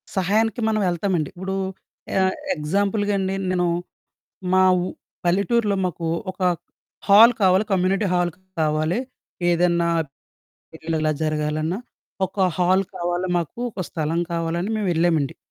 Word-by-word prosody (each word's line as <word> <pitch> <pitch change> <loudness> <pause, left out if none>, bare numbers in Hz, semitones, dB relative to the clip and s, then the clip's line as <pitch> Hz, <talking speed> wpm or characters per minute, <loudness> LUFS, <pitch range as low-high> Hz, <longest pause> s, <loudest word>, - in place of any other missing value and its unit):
సహాయానికి 215 +4 +1
మనవెళ్తామండి. 185 -6 0
ఇప్పుడూ 190 +2 -4 0.6
ఆహ్, 190 0 +2 0.2
ఎగ్జాంపుల్‌గండి, 200 +4 0 0.2
నేనూ 180 -1 +1 0.9
మా 185 - +5 0.2
ఉ - - -1 0.4
పల్లెటూర్లో 200 +4 +2
మాకు 170 -2 -3 0.2
ఒక 185 - -15 0.7
హాల్ 215 +4 +9
కావాలి, 190 +1 +4
కమ్యూనిటీ 195 +2 +2
హాల్ 175 -1 +1 0.3
కావాలి. 155 +5 +1 0.5
ఏదన్నా 170 0 +2 0.9
పెళ్ళిళ్ళిలా 160 -1 -1
జరగాలన్నా, 155 +3 -1 0.5
ఒక 190 - -22 0.2
హాల్ 185 +2 +3
కావాలి, 175 +1 -1
మాకు 170 +7 -5
ఒక 185 -4 -5
స్థలం 160 +1 -1
కావాలని 170 +3 -1
మేవెళ్ళామండి, 170 -7 +1
180 Hz, 105 wpm, -23 LUFS, 165-195 Hz, 0.9 s, హాల్